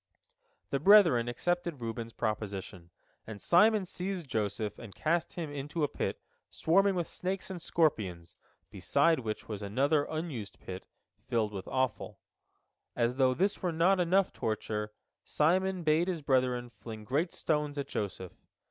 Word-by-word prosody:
" 485 -1 -44
The - - +1
brethren 180 - +6
accepted 170 +4 -1
Reuben's 115 0 -5
proposition, 100 -5 -4 0.4
and 110 -2 -7
Simon 210 - +4
seized 180 -2 -4
Joseph, 105 -2 -2
and 110 -5 -10
cast 170 +2 0
him 165 -4 -5
into 145 +3 -3
a - - +3
pit - - -3 0.3
swarming 195 +4 +3
with 175 -2 -1
snakes 190 +1 -4
and 180 -2 -6
scorpions, 95 - 0 0.4
beside 165 -3 +2
which 110 -3 -5
was 105 -2 -5
another 140 +9 +1
unused 155 - -5
pit, 95 0 -8 0.4
filled 110 -3 0
with 95 -1 -6
offal. 130 -3 -2 0.8
As 120 +1 0
though 130 -1 +3
this 195 +6 0
were 180 - 0
not 175 +4 +3
enough 185 +2 +2
torture, 105 -1 -3 0.3
Simon 185 +4 +1
bade 160 +3 +3
his 170 -5 -2
brethren 125 -3 +1
fling 110 -2 -9
great 145 - 0
stones 150 -2 -1
at 140 - -3
Joseph. 95 -3 -4
145 Hz, 150 wpm, -31 LUFS, 110-175 Hz, 0.8 s, brethren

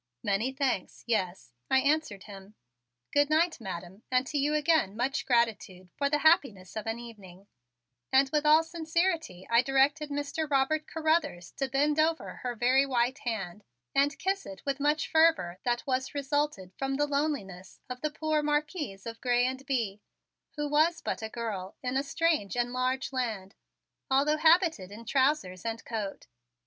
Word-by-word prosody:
"Many 205 +6 0
thanks, 265 -8 -2
yes," 190 - -2 0.2
I 265 - +4
answered 280 -8 +1
him. 200 0 -12 0.6
"Good 290 0 +3
night, 315 -2 +2
Madam, 185 0 -7
and 255 0 +2
to 295 - -3
you 295 +2 +1
again 300 - +2
much 270 +3 -1
gratitude 220 -7 0
for 280 -1 0
the 295 - +2
happiness 245 - +3
of 215 0 -4
an 225 +1 -1
evening," 200 -6 -12 0.7
and 270 +1 +5
with 300 -1 +1
all 305 +2 +6
sincerity 325 - -1
I 235 +1 +5
directed 275 +3 +2
Mr. 290 +2 -3
Robert 290 +3 +1
Carruthers 315 - 0
to 270 -1 -1
bend 290 +3 +1
over 320 +1 0
her 245 -1 -4
very 255 +4 +4
white 255 -1 0
hand 210 -4 -4 0.3
and 285 +2 +2
kiss 390 +1 -1
it 195 -1 -10
with 275 0 -1
much 300 +2 +1
fervor 315 - +3
that 240 -1 0
was 260 +1 -2
resulted 280 -9 -1
from 270 0 -1
the 295 +2 +2
loneliness 280 - -3
of 250 0 -7
the 305 - 0
poor 310 0 0
Marquise 295 - -2
of 230 0 -7
Grez 245 0 +2
and 260 +1 -4
Bye, 230 -7 -1 0.6
who 295 -1 -2
was 315 +3 +2
but - - -3
a 220 - -4
girl 210 -5 -5
in 250 0 -2
a 270 - +3
strange 290 -7 0
and 245 0 0
large 255 +2 -1
land, 220 -7 -3 0.6
although 280 +3 +3
habited 320 - +3
in 225 +3 -10
trousers 260 - +1
and 225 0 -4
coat. 215 -4 -4
265 Hz, 165 wpm, -29 LUFS, 220-300 Hz, 0.7 s, all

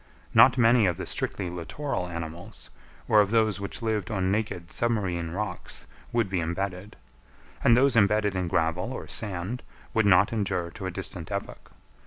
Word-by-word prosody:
Not - - +7
many 115 -3 +5
of 85 -2 0
the - - -4
strictly 95 - -2
littoral 90 - -3
animals, 85 +4 -7 0.4
or 105 - +6
of 100 - +1
those 110 -2 +2
which 100 +3 -6
lived 110 -4 -1
on 95 -2 0
naked 100 -5 -2
submarine 95 -8 0
rocks, 95 +1 -4 0.3
would 115 -3 +1
be 95 -2 -1
embedded; 90 +4 -3 0.7
and 120 - +6
those 135 0 +4
embedded 105 -1 +3
in 90 -2 -1
gravel 85 +8 0
or - - -6
sand 100 +3 -4 0.3
would 110 -2 +3
not 100 +3 +5
endure 90 -5 -1
to 95 +1 -6
a - - -3
distant 90 -2 -5
epoch. - - -5
100 Hz, 165 wpm, -27 LUFS, 90-110 Hz, 0.7 s, Not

